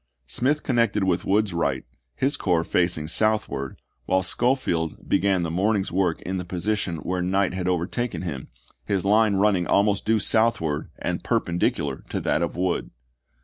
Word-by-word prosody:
Smith 135 - 0
connected 115 -6 +1
with 90 -2 0
Wood's 105 -1 +2
right, 70 -6 -1 0.3
his 135 +2 +1
corps 85 -4 +1
facing 85 -3 +1
southward, 105 -8 0 0.3
while 95 0 +2
Schofield 90 - 0
began 95 -2 +2
the 85 - -2
morning's 95 +2 +1
work 90 -2 0
in 95 +1 -3
the 90 - -3
position 90 +1 -2
where 90 +3 -3
night 95 +1 +1
had 90 -1 -3
overtaken 90 +6 -1
him, 75 -7 -5 0.4
his 100 -2 -1
line 105 0 +4
running 95 -3 +2
almost 100 0 +2
due 110 0 +2
southward 100 -8 +1
and - - -3
perpendicular 75 -5 -1
to - - -2
that 75 - 0
of 85 - -2
Wood. 90 0 -1
95 Hz, 155 wpm, -24 LUFS, 85-105 Hz, 0.4 s, line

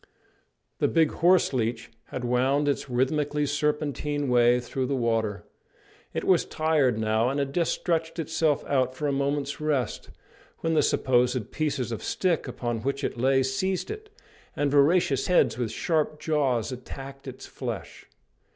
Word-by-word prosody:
The - - +3
big 160 -2 +3
horse 175 -2 +3
leech 115 -2 -2
had 125 - -5
wound 130 +4 +2
its 140 -1 -1
rhythmically 145 +4 0
serpentine 145 -1 -1
way 120 0 +4
through 130 +1 -3
the 140 - 0
water. 115 -4 0 0.7
It - - -3
was 185 -3 +4
tired 150 -7 +1
now, 110 +2 +1
and 140 - -2
had 140 -1 -2
just 170 -2 +1
stretched 165 -1 -1
itself 160 -2 0
out 130 -2 0
for 150 - -4
a - - +1
moment's 140 +1 -1
rest, 145 -5 -1 0.5
when 165 0 0
the 155 - +4
supposed 125 -2 +1
pieces 140 -6 -2
of 115 - -4
stick 175 -5 0
upon 120 -2 -3
which 140 +3 -2
it 120 - -3
lay 135 +1 +3
seized 185 - -1
it, 430 0 -8 0.5
and 145 -1 0
voracious 145 0 +3
heads 180 - +3
with 115 -3 -1
sharp 155 +4 -1
jaws 140 -7 0
attacked 135 +2 -9
its - - -8
flesh. - - -7
140 Hz, 155 wpm, -26 LUFS, 125-155 Hz, 0.7 s, way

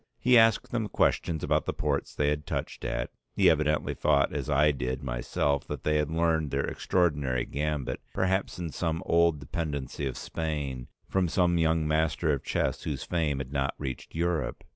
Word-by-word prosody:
He 125 0 +4
asked 115 -2 +5
them 115 -3 -1
questions 80 -3 +1
about - - +1
the - - -1
ports - - -1
they 75 0 +2
had 75 0 -2
touched - - -4
at. 65 -1 -2 0.2
He - - +6
evidently 75 -1 +1
thought 70 -2 +2
as - - -3
I 75 +1 +4
did 65 0 -3
myself 65 +3 -1
that - - -5
they 75 0 +2
had 75 -1 0
learned 80 -2 +1
their 70 0 0
extraordinary 75 -9 0
gambit, 75 -1 -2
perhaps 95 0 0
in 85 -3 -4
some 80 +1 -2
old 85 -2 +3
dependancy 70 -1 -3
of 65 - -5
Spain, 75 -6 -4 0.2
from 95 -2 +1
some 85 0 +2
young 80 -1 +2
master 75 0 +1
of 70 - -3
chess - - -1
whose - - -3
fame 80 -5 0
had 70 0 -5
not 70 -1 0
reached 65 0 -6
Europe. 85 -1 -1
75 Hz, 180 wpm, -28 LUFS, 70-85 Hz, 0.2 s, He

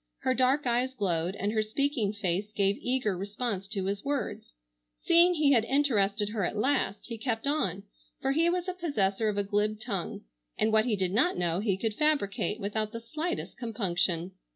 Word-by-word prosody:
Her 260 - +2
dark 260 +3 +2
eyes 250 +2 +1
glowed 180 -4 0
and 205 +1 -1
her 220 0 +1
speaking 225 0 0
face 200 0 -2
gave 200 -1 +1
eager 250 -6 0
response 200 +1 -3
to 195 -2 -2
his 200 +1 -2
words. 280 - -3 0.5
Seeing 345 +1 +5
he 300 -3 +3
had 235 -5 +5
interested 220 -7 +2
her 210 -2 -2
at 190 - -2
last, 255 -4 0
he 230 -2 -6
kept 225 0 -2
on, 200 - 0 0.4
for 270 - 0
he 325 +4 +3
was 360 +1 -1
possessor 215 - +1
of 205 - -2
a 205 - +2
glib 210 +1 0
tongue, 210 -6 -3 0.4
and 220 0 +2
what 220 0 +4
he 235 -4 +1
did 185 -2 0
not 255 - +2
know 175 0 0
he 200 -2 0
could 220 +2 -1
fabricate 280 -7 0
without 215 +1 -2
the 230 - -4
slightest 310 +9 -4
compunction. 185 -6 -1
215 Hz, 185 wpm, -29 LUFS, 200-260 Hz, 0.5 s, Seeing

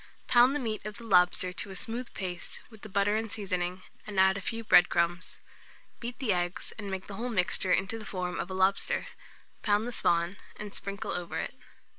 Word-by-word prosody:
Pound 245 +3 +6
the - - +1
meat 220 -5 -2
of 210 -1 -6
the 235 - -10
lobster 180 -3 +4
to 200 - -4
a 190 - -7
smooth 235 +5 -4
paste 180 -3 -5
with 220 -2 -14
the 215 - -9
butter 200 +2 +2
and 220 -1 -1
seasoning, 185 -3 -2 0.2
and 205 -2 -1
add 190 0 +6
a 200 - -3
few 230 +3 -3
bread 180 -4 +7
crumbs. 175 +2 0 0.6
Beat 240 +1 -5
the 240 -8 +1
eggs, 175 0 -2
and 205 -2 -5
make 190 -1 -3
the 200 - -7
whole 245 +2 -2
mixture 185 -3 +1
into 195 +5 +2
the 215 - -8
form 180 -2 -3
of 175 - -3
a 190 - -4
lobster; 190 +1 +2 0.6
pound 210 +2 +2
the - - -3
spawn, 170 -3 +1 0.2
and 210 -1 -7
sprinkle 200 0 -4
over 180 -1 -3
it. - - -3
195 Hz, 210 wpm, -30 LUFS, 180-220 Hz, 0.6 s, bread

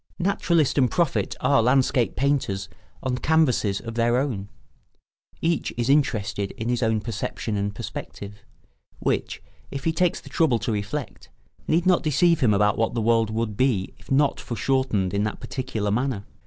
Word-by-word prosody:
Naturalist 170 -6 +1
and 130 -2 +4
prophet 170 -5 0
are 140 -5 +4
landscape 125 0 +2
painters 135 -8 0 0.3
on 125 -1 -1
canvases 130 -11 +2
of 115 - -7
their 120 +1 +2
own; 115 -8 -2 0.9
each 165 -2 0
is 120 +2 +1
interested 105 -8 +1
in 110 +1 -4
his 120 0 0
own 110 -2 +1
perception 110 0 -4
and 100 0 -2
perspective, 100 +1 -7 0.6
which, - - -2 0.3
if 140 -1 -6
he 165 - +1
takes 175 +2 +1
the - - -15
trouble 150 -8 +2
to 110 +1 -2
reflect, 105 +7 -4 0.4
need 165 +3 +2
not 185 -1 +4
deceive 165 +2 +3
him 125 -7 +3
about 105 +1 +2
what 115 +2 0
the - - 0
world 115 0 +2
would 110 -1 -2
be 115 -6 +1
if - - -19
not 140 +1 +2
foreshortened 115 -5 0
in 100 +1 +1
that 110 - -3
particular 110 -6 -3
manner. 120 -2 -1
120 Hz, 165 wpm, -24 LUFS, 105-140 Hz, 0.9 s, and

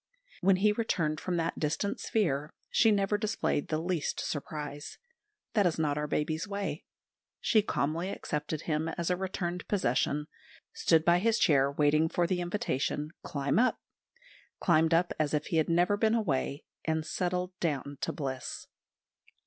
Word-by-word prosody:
When 195 +1 +4
he 205 +3 +3
returned 170 -8 0
from 180 -2 -1
that 165 0 -1
distant 160 +7 -1
sphere 150 -9 0 0.2
she 225 - +5
never 205 0 +2
displayed 215 -8 0
the 155 - 0
least 170 -1 -1
surprise. 145 0 -5 0.6
That 205 -5 +4
is 165 - -1
not 150 -3 +1
our 150 0 -2
babies' 155 +4 -1
way. 200 -6 -4 0.5
She 215 - +4
calmly 165 -1 -1
accepted 150 -4 -3
him 160 -1 -1
as 170 +2 -2
a - - +3
returned 180 -1 -3
possession; 150 - +1 0.5
stood 160 -1 +3
by 175 0 +5
his 225 +3 +2
chair 140 -5 +4
waiting 150 +2 +3
for 175 - +1
the 180 +1 0
invitation, 155 -4 -1
"Climb 140 +4 0
up"; 255 +1 +3 0.8
climbed 165 -1 +4
up 175 +1 +2
as 155 -1 +1
if 150 - -1
he 165 - -1
had 160 - +2
never 175 +4 +3
been 220 +1 +3
away 145 - -1 0.2
and 160 -1 -1
settled 180 +1 -1
down 145 -4 -2
to - - 0
bliss. 130 -3 -4
165 Hz, 155 wpm, -30 LUFS, 150-185 Hz, 0.8 s, she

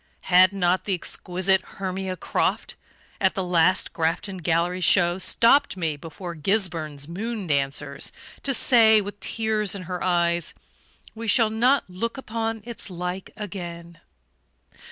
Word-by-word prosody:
Had 185 +1 +7
not 185 -2 0
the 195 - 0
exquisite 185 +2 -1
Hermia 190 -1 -5
Croft, - - -1 0.4
at - - +2
the 190 - -1
last 180 +1 +2
Grafton 170 +4 -1
Gallery 175 +2 0
show, 175 +1 +4
stopped 235 +4 +3
me 160 -4 -1
before 165 +4 -8
Gisburn's 160 -5 -1
"Moon 210 +4 -4
dancers" 140 -1 -1 0.3
to 275 - 0
say, 225 -4 +6
with 205 0 -6
tears 215 -3 0
in 190 - -6
her 180 0 -5
eyes: 170 -2 +1 0.6
"We 230 0 -7
shall 220 0 +4
not 250 +5 +2
look 210 +8 -4
upon 225 -3 -4
its 235 -3 -4
like 180 +1 -5
again"? 170 -5 -7
185 Hz, 135 wpm, -24 LUFS, 170-215 Hz, 0.6 s, Had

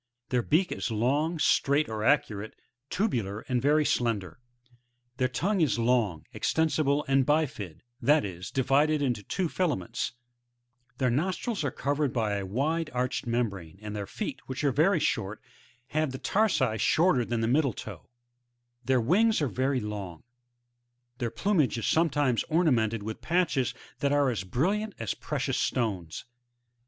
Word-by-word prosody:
Their 125 -1 +2
beak 165 +9 +1
is - - -2
long, 140 +9 +1
straight 145 0 +3
or 110 -1 -4
arcuate, 110 -6 +1 0.4
tubular 115 - -1
and 125 -2 -1
very 150 +2 +3
slender; 105 - -1 0.8
their 130 -1 +2
tongue 190 +9 0
is 150 -6 +2
long, 115 -9 +1
extensible 150 -2 +1
and 135 0 +4
bifid, 135 - -1 0.2
that 145 +1 +4
is, 90 -2 -6
divided 145 +3 +2
into 120 -6 0
two 180 - -2
filaments; 150 - -2 0.8
their 130 -2 +1
nostrils 185 - -1
are 145 - +1
covered 145 0 -1
by 110 -4 0
a 100 -1 -4
wide 155 - -1
arched 125 0 -1
membrane, 100 -8 -2
and 105 0 -6
their 100 -1 -4
feet, - - -5
which 130 +2 -4
are 140 - +3
very 165 +7 +3
short, 100 -7 -1 0.5
have 155 -2 0
the 130 - -5
tarsi 135 - +1
shorter 160 -7 +3
than 115 0 -2
the 115 - +1
middle 140 +4 +3
toe; 100 -7 -9 0.7
their 130 +1 +2
wings 210 - +3
are 145 - +1
very 130 +1 0
long; 100 -6 -6 1.0
their 120 -3 -1
plumage 135 - +1
is 115 - -3
sometimes 145 -7 +2
ornamented 120 - +2
with 110 +1 -6
patches 165 -8 +1 0.2
that 140 - +1
are 145 -2 +3
as 110 -6 -3
brilliant 190 - -1
as 115 -4 -2
precious - - -2
stones. 95 -10 -2
130 Hz, 150 wpm, -28 LUFS, 110-155 Hz, 1.0 s, and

